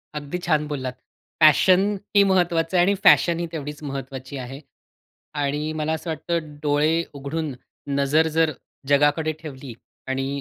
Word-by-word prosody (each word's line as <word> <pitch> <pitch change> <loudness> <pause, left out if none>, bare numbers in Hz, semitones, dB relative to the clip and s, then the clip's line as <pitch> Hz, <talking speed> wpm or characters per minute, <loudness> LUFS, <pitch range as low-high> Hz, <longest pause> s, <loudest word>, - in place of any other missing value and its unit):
अगदी 150 +4 -4
छान 150 -2 +2
बोललात. 130 -4 -4 0.5
पॅशन 180 +5 +6 0.3
ते 200 -1 +6
महत्त्वाचं 175 -2 +1
आहे 175 - +5
आणि 200 +1 +2
फॅशनही 170 0 +5
तेवढीच 150 -2 -6
महत्त्वाची 135 -1 -6
आहे. 130 +2 -7 0.7
आणि 150 +1 -2
मला 155 +1 0
असं 160 +2 -5
वाटतं, 160 -1 -3
डोळे 150 +1 +2 0.2
उघडून 145 +1 -4 0.4
नजर 145 +3 +3
जर 160 -1 +4 0.4
जगाकडे 145 +3 +3
ठेवली 135 -4 -8 0.3
आणि 135 0 -2
150 Hz, 135 wpm, -23 LUFS, 140-165 Hz, 0.7 s, पॅशन